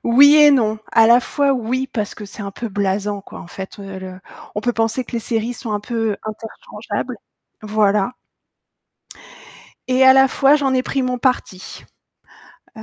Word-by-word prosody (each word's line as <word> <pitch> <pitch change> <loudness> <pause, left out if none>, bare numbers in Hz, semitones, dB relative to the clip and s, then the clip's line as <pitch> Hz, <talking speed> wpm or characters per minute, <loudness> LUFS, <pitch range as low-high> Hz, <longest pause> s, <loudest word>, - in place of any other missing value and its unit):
oui 280 +5 +6
et 295 -1 +7
non. 220 -6 +1
À 225 -1 +5
la 235 +2 +6
fois 280 +2 0
oui, 255 +1 -2
parce 210 -4 -3
que 210 - -9
c'est 205 +1 -8
un 200 - -5
peu 230 +4 -6
blasant, 200 0 -2
quoi, - - -12
en - - -11
fait, 190 +4 -9
heu, 195 -1 -8
le 185 0 -9 0.3
on 210 - -2
peut 245 +3 -1
penser 225 +2 -1
que - - -14
les 235 - -1
séries 230 +1 -1
sont 230 -2 -6
un 205 - -2
peu 225 -1 -2
interchangeables, 225 - -7 0.5
voilà 210 0 +1 1.8
et 260 +1 +3
à 260 - +8
la 265 0 +5
fois 275 +2 +3
j'en 275 -3 +1
ai 255 - +1
pris 270 +1 -2
mon 250 0 -2
parti. 240 -7 -3 0.9
Heu, 220 - -9
225 Hz, 185 wpm, -19 LUFS, 205-255 Hz, 1.8 s, à